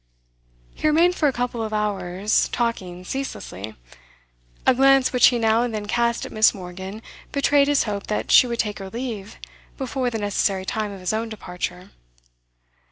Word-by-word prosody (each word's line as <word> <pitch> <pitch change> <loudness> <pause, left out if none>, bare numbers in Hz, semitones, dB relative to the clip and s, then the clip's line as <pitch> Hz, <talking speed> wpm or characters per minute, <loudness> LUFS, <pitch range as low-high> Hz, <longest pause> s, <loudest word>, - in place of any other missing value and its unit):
He - - -1
remained 335 +4 +4
for 310 -4 +1
a - - +3
couple 245 -2 -3
of 220 -1 -4
hours, 200 -1 0
talking 185 -7 -2
ceaselessly. 110 - -6 0.9
A - - +6
glance 270 0 +4
which 250 - +7
he 245 - +2
now 225 0 +3
and 240 -2 -2
then 210 -1 -4
cast 235 +2 0
at - - -9
Miss. 215 0 +4
Morgan 190 +3 -8 0.3
betrayed 280 0 +3
his 290 -1 +3
hope 205 -3 -4
that 210 - -2
she 250 - +7
would 235 -1 -3
take 210 -2 -2
her 195 -1 -7
leave 225 -3 -6 0.4
before 260 -1 -2
the 230 - -3
necessary 200 -2 0
time 215 +1 -2
of 195 -2 -9
his 185 +3 -1
own 225 +1 -2
departure. 180 -2 -6
220 Hz, 170 wpm, -23 LUFS, 195-250 Hz, 0.9 s, which